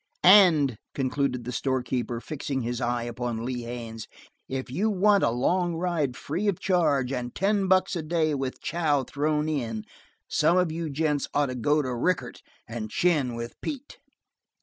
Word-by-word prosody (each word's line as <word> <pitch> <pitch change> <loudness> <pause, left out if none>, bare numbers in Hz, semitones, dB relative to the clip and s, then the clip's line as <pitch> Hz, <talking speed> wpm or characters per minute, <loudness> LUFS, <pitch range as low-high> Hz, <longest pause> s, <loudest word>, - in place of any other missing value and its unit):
"And," 170 - +7 0.2
concluded 130 -2 -1
the 125 - -5
store 130 0 -1
keeper, 120 -2 -2
fixing 140 0 -4
his 120 +1 -3
eye 120 -1 0
upon 120 -1 -4
Lee 125 -1 -3
Haines, 115 -2 -7 0.4
"if 130 -1 -4
you 200 +11 +1
want 200 0 +3
a - - +4
long 170 +9 +1
ride 165 -7 -1
free 175 +8 -3
of 200 -4 +1
charge, 150 -9 +2
and 125 -1 -4
ten 200 0 +1
bucks 185 +1 +3
a 170 - -1
day 155 -1 0
with 135 -2 -3
chow 150 -5 +1
thrown 150 +3 -1
in 115 -8 -2 0.4
some 165 +4 +3
of 180 -3 +2
you 165 0 -3
gents 150 0 0
ought 145 -2 +2
to 125 - -4
go 145 +5 +2
to 130 -2 -3
Rickett 175 +9 -1 0.3
and 115 -1 -5
chin 145 -5 +1
with 115 0 -5
Pete." 285 -1 -6
140 Hz, 170 wpm, -26 LUFS, 125-170 Hz, 0.4 s, And